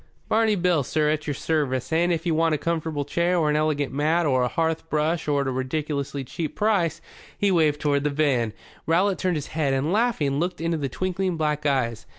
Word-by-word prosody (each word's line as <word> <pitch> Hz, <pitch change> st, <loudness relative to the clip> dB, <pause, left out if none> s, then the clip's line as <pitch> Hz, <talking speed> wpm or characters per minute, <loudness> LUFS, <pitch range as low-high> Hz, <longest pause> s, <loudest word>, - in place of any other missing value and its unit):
"Barney 220 Hz, -1 st, +3 dB
Bill, 175 Hz, -4 st, +2 dB
sir, 150 Hz, +3 st, +1 dB
at 155 Hz, -1 st, -2 dB
your 145 Hz, -, -1 dB
service. 145 Hz, -3 st, -1 dB
And, 170 Hz, +2 st, +2 dB
if 165 Hz, 0 st, -1 dB
you 170 Hz, -, +1 dB
want 160 Hz, 0 st, +2 dB
a -, -, -1 dB
comfortable 160 Hz, -2 st, -2 dB
chair, 170 Hz, +5 st, +1 dB
or 155 Hz, -3 st, +2 dB
an -, -, +1 dB
elegant 150 Hz, -3 st, 0 dB
mat, 155 Hz, +4 st, +1 dB
or 130 Hz, -3 st, +2 dB
a 125 Hz, -, +2 dB
hearth 160 Hz, +3 st, -1 dB
brush 155 Hz, +2 st, 0 dB
at 140 Hz, -1 st, +1 dB
a -, -, 0 dB
ridiculous 140 Hz, +2 st, -3 dB
cheap 155 Hz, +4 st, -5 dB
price" 190 Hz, -6 st, +1 dB, 0.4 s
he 200 Hz, -1 st, +2 dB
waved 155 Hz, -4 st, +2 dB
toward 145 Hz, -2 st, +1 dB
the 150 Hz, -, +1 dB
van. 140 Hz, -6 st, +1 dB, 0.4 s
Rowlatt 185 Hz, +4 st, +2 dB
turned 180 Hz, -3 st, 0 dB
his 145 Hz, -, -5 dB
head 145 Hz, -4 st, +1 dB
and, 140 Hz, +5 st, 0 dB
laughing, 200 Hz, -, +1 dB
looked 175 Hz, +2 st, -2 dB
into 165 Hz, 0 st, -1 dB
the 140 Hz, -3 st, -2 dB
twinkling 185 Hz, +3 st, -2 dB
black 150 Hz, -1 st, 0 dB
eyes. 125 Hz, -5 st, -1 dB
155 Hz, 210 wpm, -24 LUFS, 145-170 Hz, 0.4 s, Barney